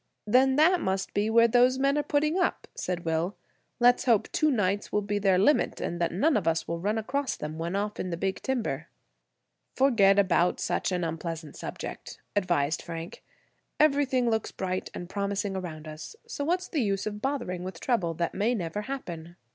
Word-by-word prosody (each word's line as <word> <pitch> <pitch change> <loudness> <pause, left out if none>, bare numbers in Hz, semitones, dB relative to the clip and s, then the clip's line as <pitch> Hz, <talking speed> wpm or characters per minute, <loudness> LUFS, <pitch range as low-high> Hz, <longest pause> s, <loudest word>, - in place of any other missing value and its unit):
"Then 260 +5 +4
that 335 +4 +4
must 190 0 -2
be 205 +2 +1
where 230 +1 +6
those 245 +2 +4
men 275 +1 +2
are 295 - +2
putting 300 +2 +1
up," 360 - 0
said 175 -2 -4
Will. 165 +4 0 0.4
"Let's 245 0 +4
hope 230 -5 +3
two 310 - +2
nights 205 -6 0
will 210 - +1
be 205 0 -1
their 195 -2 +3
limit, 250 +11 +3
and 175 0 -3
that 170 - +1
none 275 - +2
of 195 -6 0
us 165 0 +1
run 185 +6 -1
across 270 +5 -1
them 155 +1 -6
when 170 +3 -2
off 205 +1 -2
in 185 - -2
the 170 - -3
big 190 +2 -2
timber." 220 - -2 0.9
"Forget 220 -8 +4
about 180 -3 +3
such - - -1
an 180 -1 -1
unpleasant 165 -1 -4
subject," - - -7 0.2
advised 170 -6 +1
Frank. 165 0 -7 0.6
"Everything 275 -4 +3
looks 220 -1 0
bright 185 -1 -3
and 175 - -6
promising 200 0 -2
around 160 -4 -6
us, 155 - -8
so 285 - -4
what's 360 +4 0
the 305 - -1
use 200 -3 0
bothering 215 -4 -3
with 185 -2 -6
trouble 180 -10 0
that 170 +1 -1
may 220 +5 +1
never 180 0 -3
happen?" 175 -10 -6
200 Hz, 185 wpm, -28 LUFS, 175-250 Hz, 0.9 s, where